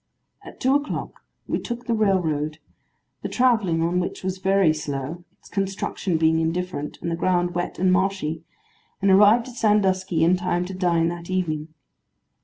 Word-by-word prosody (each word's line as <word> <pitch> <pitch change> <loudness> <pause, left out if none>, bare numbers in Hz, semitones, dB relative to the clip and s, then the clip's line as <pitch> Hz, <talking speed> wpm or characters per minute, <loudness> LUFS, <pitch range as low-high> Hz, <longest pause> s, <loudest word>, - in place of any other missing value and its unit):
At - - -12
two 260 +1 +2
o'clock 290 +1 -3 0.2
we - - -1
took 240 0 -6
the 235 - 0
railroad; 165 -8 +1 0.6
the - - -4
travelling 220 -10 +2
on 175 +2 +1
which 180 - -4
was 190 0 -3
very 190 -4 +3
slow, 150 +2 -5
its - - -19
construction 195 -2 -2
being 160 0 +3
indifferent, 165 -2 -3
and 170 - -2
the - - 0
ground 175 0 +1
wet 175 0 -3
and 185 +1 +3
marshy; 185 -4 0 0.6
and 195 0 +3
arrived 210 +5 +6
at 245 - -12
Sandusky 190 -5 +2
in 175 +2 +4
time 180 0 -1
to 190 - -6
dine 170 -3 +1
that 170 0 -7
evening. 160 -5 -1
180 Hz, 165 wpm, -23 LUFS, 165-195 Hz, 0.6 s, arrived